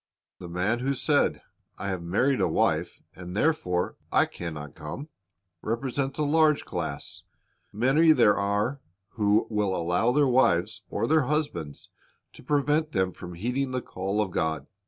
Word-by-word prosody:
The 90 Hz, -, -8 dB
man 95 Hz, +7 st, 0 dB
who 135 Hz, +2 st, -1 dB
said, 145 Hz, +2 st, +2 dB
'T -, -, -20 dB, 0.4 s
have 95 Hz, -3 st, -2 dB
married 115 Hz, +11 st, +1 dB
a -, -, +3 dB
wife, -, -, 0 dB
and 90 Hz, +2 st, -7 dB
therefore 90 Hz, -, 0 dB
I -, -, +4 dB
can 85 Hz, -2 st, -7 dB
not 75 Hz, -1 st, -8 dB
come," 135 Hz, -, -7 dB, 0.5 s
represents 135 Hz, +4 st, -2 dB
a 155 Hz, -, +1 dB
large 155 Hz, 0 st, +3 dB
class. -, -, -5 dB, 0.5 s
Many 135 Hz, +9 st, +4 dB
there 105 Hz, -9 st, +5 dB
are 105 Hz, +7 st, -1 dB, 0.3 s
who 105 Hz, 0 st, +2 dB
allow 95 Hz, 0 st, +1 dB
their 145 Hz, +2 st, +3 dB
wives 120 Hz, -9 st, +2 dB
or -, -, -1 dB
their 155 Hz, -3 st, +3 dB
husbands 125 Hz, -, -3 dB, 0.4 s
to -, -, -13 dB
prevent 150 Hz, +3 st, +1 dB
them 95 Hz, -3 st, +1 dB
from 90 Hz, 0 st, -9 dB
heeding 125 Hz, +7 st, -2 dB
the 130 Hz, -, -1 dB
call 95 Hz, +3 st, -2 dB
of 100 Hz, -3 st, -2 dB
God. 80 Hz, -4 st, -1 dB
110 Hz, 155 wpm, -27 LUFS, 90-140 Hz, 0.5 s, there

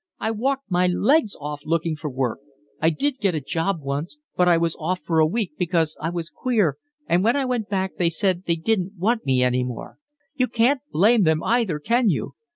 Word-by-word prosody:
I 220 Hz, -, -1 dB
walked 265 Hz, +1 st, -2 dB
my 180 Hz, +1 st, +3 dB
legs 215 Hz, -, +2 dB
off 145 Hz, 0 st, -5 dB
looking 165 Hz, 0 st, 0 dB
for 150 Hz, 0 st, -5 dB
work. 130 Hz, -3 st, -2 dB, 0.4 s
I 160 Hz, -, +4 dB
did 260 Hz, -, -1 dB
get 195 Hz, -5 st, +1 dB
a -, -, 0 dB
job 165 Hz, +5 st, -2 dB
once, 145 Hz, -, -4 dB, 0.2 s
but 180 Hz, -, +3 dB
I 175 Hz, -1 st, +5 dB
was 165 Hz, -1 st, 0 dB
off 180 Hz, +3 st, -1 dB
for 160 Hz, +1 st, 0 dB
a 155 Hz, -, +5 dB
week 205 Hz, +1 st, -2 dB
because 165 Hz, -3 st, +1 dB
I 160 Hz, -, -1 dB
was 170 Hz, -1 st, -4 dB
queer, 210 Hz, -, 0 dB, 0.3 s
and 180 Hz, -5 st, +2 dB
when 230 Hz, +4 st, +3 dB
I 280 Hz, -2 st, 0 dB
went 245 Hz, -4 st, -2 dB
back 190 Hz, -2 st, -2 dB
they 170 Hz, -2 st, +3 dB
said 185 Hz, +2 st, 0 dB
they 170 Hz, -, +2 dB
didn't 190 Hz, +3 st, -1 dB
want 220 Hz, -, 0 dB
me 130 Hz, -1 st, +3 dB
any 125 Hz, 0 st, +2 dB
more. 125 Hz, -1 st, -7 dB, 0.3 s
You 255 Hz, -4 st, +1 dB
can't 245 Hz, +4 st, +2 dB
blame 215 Hz, +7 st, +4 dB
them 160 Hz, -3 st, +2 dB
either, 225 Hz, -9 st, +1 dB
can 230 Hz, +8 st, +2 dB
you? -, -, -2 dB
180 Hz, 215 wpm, -23 LUFS, 160-225 Hz, 0.4 s, I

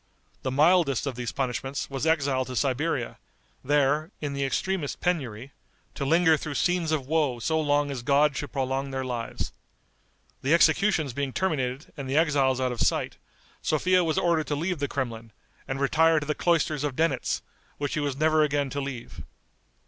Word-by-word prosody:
The 130 Hz, -, -2 dB
mildest 150 Hz, -1 st, +3 dB
of 140 Hz, -, -2 dB
these 120 Hz, -1 st, -4 dB
punishments 135 Hz, +1 st, -3 dB
was 140 Hz, +3 st, -3 dB
exile 140 Hz, -5 st, +2 dB
to 125 Hz, -, -6 dB
Siberia, 135 Hz, 0 st, -1 dB, 0.4 s
there, 145 Hz, +3 st, +2 dB
in 145 Hz, -2 st, -3 dB
the 140 Hz, 0 st, -1 dB
extremest 160 Hz, +3 st, -2 dB
penury, 135 Hz, -8 st, -2 dB, 0.4 s
to 140 Hz, -, -3 dB
linger 160 Hz, +2 st, +4 dB
through 145 Hz, 0 st, -5 dB
scenes 175 Hz, +1 st, +1 dB
of 150 Hz, -4 st, 0 dB
woe 145 Hz, -4 st, +1 dB
so 160 Hz, +7 st, 0 dB
long 145 Hz, -1 st, +1 dB
as 130 Hz, -3 st, -4 dB
God 140 Hz, +3 st, +3 dB
should 145 Hz, -, -4 dB
prolong 135 Hz, 0 st, -1 dB
their 135 Hz, -1 st, -3 dB
lives. 120 Hz, -2 st, -4 dB, 0.9 s
The 140 Hz, +5 st, +3 dB
executions 160 Hz, -, +3 dB
being 140 Hz, +1 st, -2 dB
terminated 135 Hz, -7 st, -2 dB
and 140 Hz, -4 st, -6 dB
the 135 Hz, -, +1 dB
exiles 140 Hz, -5 st, +3 dB
out 130 Hz, -1 st, 0 dB
of 120 Hz, -, -4 dB
sight, -, -, 0 dB, 0.4 s
Sophia 180 Hz, +4 st, +2 dB
was 160 Hz, -2 st, 0 dB
ordered 170 Hz, -3 st, +2 dB
to 145 Hz, -, -1 dB
leave 170 Hz, +2 st, -2 dB
the 140 Hz, -, 0 dB
Kremlin, 115 Hz, -5 st, -4 dB, 0.3 s
and 135 Hz, 0 st, -3 dB
retire 160 Hz, +3 st, +4 dB
to 145 Hz, -, -6 dB
the 150 Hz, -, 0 dB
cloisters 155 Hz, -3 st, +1 dB
of 145 Hz, -3 st, -2 dB
Denitz, 165 Hz, +3 st, 0 dB, 0.3 s
which 145 Hz, -1 st, -2 dB
she -, -, -1 dB
was 145 Hz, -2 st, -2 dB
never 155 Hz, +1 st, +3 dB
again 145 Hz, -2 st, +1 dB
to 140 Hz, -, -2 dB
leave. 135 Hz, -4 st, -6 dB
145 Hz, 180 wpm, -26 LUFS, 135-160 Hz, 0.9 s, linger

